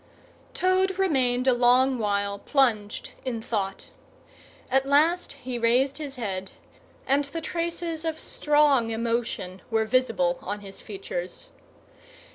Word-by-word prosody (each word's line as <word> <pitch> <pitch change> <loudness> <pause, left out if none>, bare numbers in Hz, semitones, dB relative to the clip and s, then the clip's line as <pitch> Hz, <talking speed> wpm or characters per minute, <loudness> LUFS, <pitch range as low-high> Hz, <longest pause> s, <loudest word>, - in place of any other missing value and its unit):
Toad 375 0 +2
remained 260 -9 +2
a 260 - +5
long 250 +1 +4
while 200 -1 -1
plunged 225 -7 0
in 250 -3 -3
thought. 205 -3 -3 0.8
At 265 +1 +2
last 320 +6 +3
he 250 -1 -5
raised 260 +5 +2
his 285 -3 -5
head, 195 -6 -4 0.5
and 280 +2 +2
the 320 +4 -5
traces 335 0 -3
of 320 -1 -2
strong 295 -6 +3
emotion 225 -5 -2
were 225 -1 +1
visible 220 -7 +1
on 205 +2 -4
his 195 -1 -10
features. - - -6
255 Hz, 120 wpm, -26 LUFS, 225-305 Hz, 0.8 s, a